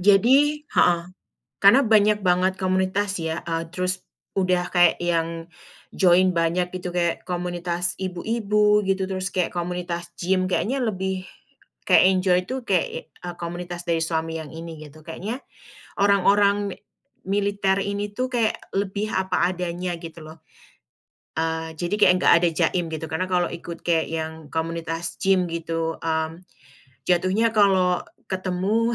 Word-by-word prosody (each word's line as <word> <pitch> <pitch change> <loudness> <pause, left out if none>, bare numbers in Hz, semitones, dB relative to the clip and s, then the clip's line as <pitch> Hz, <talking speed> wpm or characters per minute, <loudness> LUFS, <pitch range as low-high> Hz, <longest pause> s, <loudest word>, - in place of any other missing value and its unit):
Jadi 265 +10 +4
heeh, 175 -1 +3 0.6
karena 200 +7 +8
banyak 215 -1 +4
banget 185 +1 +3
komunitas 190 +1 0
ya, 160 0 -3
eee, 165 -1 -3
terus 185 0 -2 0.3
udah 180 -2 +1
kayak 175 -2 +4
yang 165 0 -1 0.4
join 185 0 +4
banyak 175 +2 +1
itu, 180 0 -4
kayak 170 -1 -1
komunitas 175 -1 -1
ibu-ibu 210 +2 +1
gitu, 195 0 +1
terus 185 0 -2
kayak 180 -2 +1
komunitas 175 0 -4
gym, 185 +1 +1
kayaknya 235 +9 0
lebih 190 -3 -2 0.6
kayak - - +6
enjoy 185 -1 +3
tu, 260 0 -3
kayak, 185 -6 -1
eee, 175 -1 -8
komunitas 175 0 -5
dari 165 -1 +1
suami 160 0 -2
yang 155 -2 -9
ini 165 -1 -8
gitu, 155 +2 -16
kayaknya 205 +10 -5 0.6
orang-orang 200 0 +3
mi - - -15 0.5
militer 200 0 +1
ini 200 +1 -2
tuh, 255 0 -2
kayak 230 -3 +1 0.2
lebih 200 +2 -2
apa 185 -2 +1
adanya 180 0 -3
gitu 165 -1 -9
loh. 160 +1 -12 1.0
Eee, 160 0 -2
jadi 175 +4 -1
kek 205 -3 +6
enggak - - +4
ada 175 - +4
jaim 175 +2 +1
gitu, 160 0 -4
karena 160 +4 -1
kalau 180 -1 +2
ikut 170 0 -7
kek 165 -2 +1
yang 160 -1 -5
komunitas 165 +1 -3
gym 190 -2 +3
gitu, 165 -1 -3
mmm, 160 +1 -2 0.6
jatuhnya 185 +6 +2
kalo 190 -4 +3 0.3
ketemu, 190 +5 0
180 Hz, 140 wpm, -24 LUFS, 170-195 Hz, 1.0 s, karena